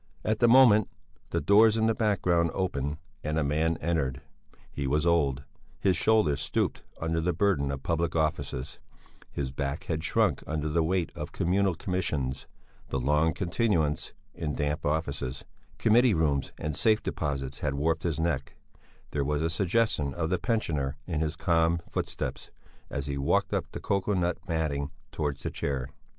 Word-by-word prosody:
At 110 0 +1
the 120 - +5
same 115 - +6
moment 115 -6 +7 0.4
the - - 0
doors 105 +7 +5
in 110 - +2
the 115 - +3
background 90 -6 +2
opened 75 -6 -1 0.3
and 75 +1 -1
a 80 - +2
man 80 +3 +1
entered. 70 -5 0 0.5
He 70 -1 -3
was 75 +4 +1
old; 70 -6 +2 0.4
his 95 -2 +3
shoulders 85 -8 +3
stooped - - -1 0.2
under 80 0 0
the 90 +2 +1
burden 85 -6 +1
of 70 -1 -4
public 85 0 0
offices; 70 -4 -2 0.5
his 65 -2 -3
back 70 +2 -3
had 80 -3 -3
shrunk 80 - +2
under 75 -1 -2
the 85 +2 +2
weight 85 -2 0
of - - -5
communal 95 +1 +1
commissions; 75 -8 -2 0.4
the 65 - -1
long 75 +5 +2
continuance 85 -5 0 0.2
in 75 -3 -3
damp 75 +1 -1
offices, 70 -4 -2 0.3
committee 115 0 +4
rooms 75 -4 +1
and 75 -1 -3
safe 110 +5 +3
deposits 70 -3 -3
had 70 -2 -1
warped 80 +3 +1
his 80 -3 -1
neck; 80 -5 -1 0.6
there 70 - 0
was 75 +2 0
a 80 - 0
suggestion 90 -6 +1
of 80 0 -2
the 90 - +1
pensioner 80 - -1
in 85 -4 -2
his 80 0 -1
calm 85 0 +2
footsteps, - - -4 0.4
as 70 -1 -3
he 70 -1 -3
walked 70 - +1
up - - 0
the - - -6
cocoa 100 +1 0
nut 90 -1 0
matting 75 -4 -1 0.2
towards 75 -2 -3
the - - -2
chair. 70 -2 -3
80 Hz, 165 wpm, -28 LUFS, 70-90 Hz, 0.6 s, moment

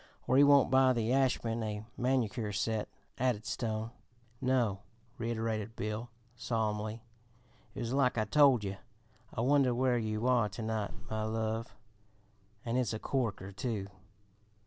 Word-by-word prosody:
"Or 130 - +2
'He 140 - +8
Won't 140 -2 +6
Buy 130 -1 +5
the 115 0 0
Ashman 120 -4 +1
a 105 -1 -4
Manicure 120 -4 0
Set,'" 105 +2 -1 0.3
added 120 -4 0
Stone. 110 -1 -2 0.5
"No," 125 -6 +1 0.4
reiterated 115 -1 -2
Bill 110 +3 -4 0.3
solemnly. 110 -1 -2 0.7
"It - - -4
was 120 +1 -2
like 135 -3 +2
I 110 - +2
told 135 -1 +5
yer; 95 -1 -4 0.5
'I - - -3
Wonder 130 -1 +3
Where 125 -1 +2
You 110 0 -2
Are 120 -4 +3
To 100 +4 -7
night, 110 -2 -1 0.2
My 110 0 -2
Love,' 110 -1 -2 0.9
and 120 +2 0
it's 120 -4 0
a 110 - -3
corker, 110 -8 -2
too! 100 -2 -3
115 Hz, 145 wpm, -32 LUFS, 110-125 Hz, 0.9 s, He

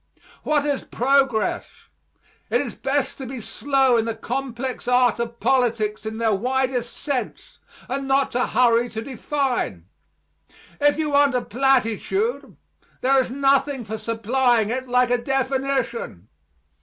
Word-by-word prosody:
What 295 -1 +1
is 285 -2 -1
progress? 260 -3 +1 0.8
It - - +2
is - - -3
best 270 0 -2
to 265 - -6
be 260 0 -6
slow 265 +1 +1
in 225 - +1
the 230 -1 -3
complex 255 +1 -4
arts 250 -2 +3
of 235 0 -4
politics 230 -5 0
in 220 0 -5
their 225 -1 +1
widest 250 +2 -1
sense, 285 - -4 0.3
and 270 +1 -3
not 270 0 +2
to 250 +1 0
hurry 240 -1 +3
to 220 0 -5
define. 260 - -2 0.9
If 290 0 +3
you 310 -2 -1
want 285 -2 +4
a 250 - +1
platitude, 270 - 0 0.4
there 265 +1 +4
is 255 - -4
nothing 275 0 +1
for 220 0 -6
supplying 230 +1 +1
it 255 +1 -3
like 250 0 +2
a 245 - +3
definition. 265 - -2
255 Hz, 140 wpm, -22 LUFS, 230-270 Hz, 0.9 s, want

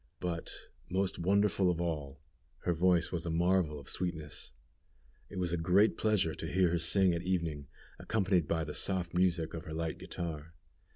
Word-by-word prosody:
But, 85 -2 -3 0.4
most 95 +1 0
wonderful 100 +1 +3
of 85 -1 0
all, 75 -5 -3 0.4
her 90 - +2
voice 85 0 +3
was 85 -1 -2
a - - -1
marvel 85 -2 +2
of 70 - -13
sweetness. 80 -5 -3 0.8
It 100 - -8
was 90 -2 -1
a - - +1
great 90 +6 +4
pleasure 105 -7 +2
to - - -5
hear 90 -1 +3
her 85 - +1
sing 90 +2 +3
at 85 - -2
evening, 85 -6 -2 0.3
accompanied 95 -7 +1
by 80 -1 0
the 75 -1 -5
soft 90 -3 -1
music 90 -3 +1
of 80 - -6
her 80 - -6
light 80 -1 -3
guitar. 85 -1 -6
85 Hz, 175 wpm, -32 LUFS, 80-95 Hz, 0.8 s, great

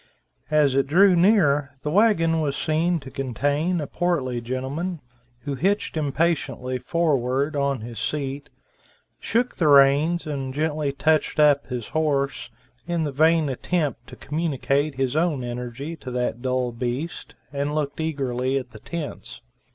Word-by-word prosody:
As 150 -3 +3
it 135 +1 +2
drew 185 +5 +5
near, 150 -7 +3
the 150 - -2
wagon 165 -5 +3
was 140 -2 -1
seen 165 +2 +1
to 135 -1 -10
contain 145 - -1
a 150 - -2
portly 140 -7 -1
gentleman, 135 +9 -3 0.4
who 145 - -4
hitched 190 +10 0
impatiently 140 -4 -1
forward 140 -1 0
on 140 -3 0
his 115 0 -7
seat, 140 -1 -3 0.7
shook 240 +2 -1
the 165 - +2
reins 145 +5 +5
and 135 -3 -4
gently 150 -1 0
touched 155 +2 +1
up 145 -2 +4
his 125 -3 -5
horse, 140 -4 -1 0.4
in 170 -2 0
the 150 - -2
vain 160 +2 +3
attempt 140 -2 -2
to - - -11
communicate 145 -2 -1
his 135 0 -1
own 155 -5 +1
energy 125 +6 -5
to 130 - -8
that 125 -1 -2
dull 130 -1 0
beast, 125 +7 -4 0.2
and 145 +1 -2
looked 150 0 -2
eagerly 135 -4 -1
at 130 -2 -5
the 110 - -12
tents. 145 -5 -7
145 Hz, 145 wpm, -24 LUFS, 130-160 Hz, 0.7 s, drew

